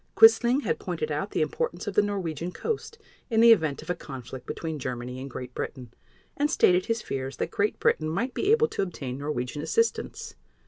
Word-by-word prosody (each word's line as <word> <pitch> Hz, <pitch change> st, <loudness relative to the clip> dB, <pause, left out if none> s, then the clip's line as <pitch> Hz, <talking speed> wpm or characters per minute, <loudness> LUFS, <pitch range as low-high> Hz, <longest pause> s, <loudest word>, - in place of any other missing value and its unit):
Quisling 275 Hz, -, +7 dB
had 465 Hz, -, -1 dB
pointed 460 Hz, -, -3 dB
out -, -, -2 dB
the -, -, +1 dB
importance 485 Hz, 0 st, -3 dB
of -, -, -3 dB
the -, -, +5 dB
Norwegian 180 Hz, -5 st, -3 dB
coast 455 Hz, -, -4 dB, 0.3 s
in 225 Hz, -2 st, +2 dB
the 230 Hz, 0 st, +8 dB
event 160 Hz, -10 st, +3 dB
of -, -, -14 dB
a -, -, +2 dB
conflict 130 Hz, -5 st, -9 dB
between 160 Hz, -2 st, -4 dB
Germany 125 Hz, 0 st, -4 dB
and 135 Hz, -, -6 dB
Great 125 Hz, 0 st, -7 dB
Britain, 125 Hz, -4 st, -6 dB, 0.4 s
and 295 Hz, +1 st, +1 dB
stated 180 Hz, -, +4 dB
his 230 Hz, -1 st, -1 dB
fears 135 Hz, -1 st, -4 dB
that 165 Hz, -, -2 dB
Great 205 Hz, +1 st, 0 dB
Britain 155 Hz, -1 st, +2 dB
might 215 Hz, +11 st, -1 dB
be 405 Hz, -, +1 dB
able 460 Hz, +1 st, +5 dB
to -, -, -2 dB
obtain 140 Hz, -9 st, -4 dB
Norwegian 145 Hz, -1 st, -3 dB
assistance. 460 Hz, -, -1 dB
170 Hz, 195 wpm, -27 LUFS, -, 0.4 s, the